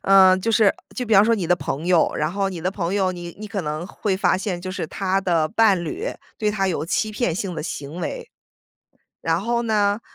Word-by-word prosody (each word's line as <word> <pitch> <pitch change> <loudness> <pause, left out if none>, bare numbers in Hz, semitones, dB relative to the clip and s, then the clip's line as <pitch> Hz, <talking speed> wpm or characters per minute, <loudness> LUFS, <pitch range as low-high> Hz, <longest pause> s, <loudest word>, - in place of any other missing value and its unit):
呃， 190 -1 +7
就 225 +5 -1
是 215 -2 +5 0.2
就 250 - -3
比 225 - -3
方 200 +1 +7
说 230 - +3
你 200 -5 -2
的 180 +1 +3
朋 155 +2 -4
友， 175 -3 +3
然 155 +2 -1
后 195 0 0
你 180 -3 -6
的 180 +3 -1
朋 185 -1 -2
友， 190 -2 +2
你 175 -1 -8
你 215 - -6
可 195 -2 -3
能 150 +2 -3
会 195 0 -2
发 190 - +2
现 185 -2 -3
就 185 +1 -5
是 185 -4 -4
她 195 +2 -1
的 170 -5 +1
伴 205 -5 +3
侣 405 - -4 0.3
对 210 -1 +1
她 195 -2 0
有 165 - -1
欺 215 +4 0
骗 210 -5 -1
性 185 0 -3
的 160 - -4
行 145 0 -6
为。 170 - -5 0.9
然 165 +1 0
后 235 +3 0
呢， 210 -2 +1
190 Hz, 250 characters per minute, -22 LUFS, 175-210 Hz, 0.9 s, 呃